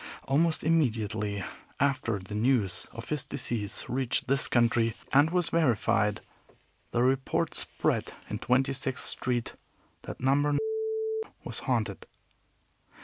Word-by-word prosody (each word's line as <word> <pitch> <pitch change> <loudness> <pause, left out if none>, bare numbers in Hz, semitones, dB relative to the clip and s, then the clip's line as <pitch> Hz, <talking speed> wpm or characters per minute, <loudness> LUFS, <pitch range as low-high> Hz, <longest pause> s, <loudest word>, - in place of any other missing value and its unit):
Almost 160 +4 +2
immediately 110 - +1 0.4
after 135 -6 +1
the 100 +2 -9
news 110 -3 +1
of 115 0 -9
his 150 -3 0
decease 120 -6 -3
reached 130 -1 0
this 135 0 +1
country 115 -1 +2 0.2
and 145 +3 +6
was 175 -1 +1
verified, 110 -9 +2 0.7
the 120 - +1
report 130 +1 +1
spread - - 0 0.2
in - - -4
Twenty 130 +2 +2
sixth 130 -1 -1
Street 120 -2 -1 0.5
that - - -8
No. 145 +3 +2 0.9
was - - -5
haunted. - - -1
125 Hz, 115 wpm, -29 LUFS, 115-140 Hz, 0.9 s, and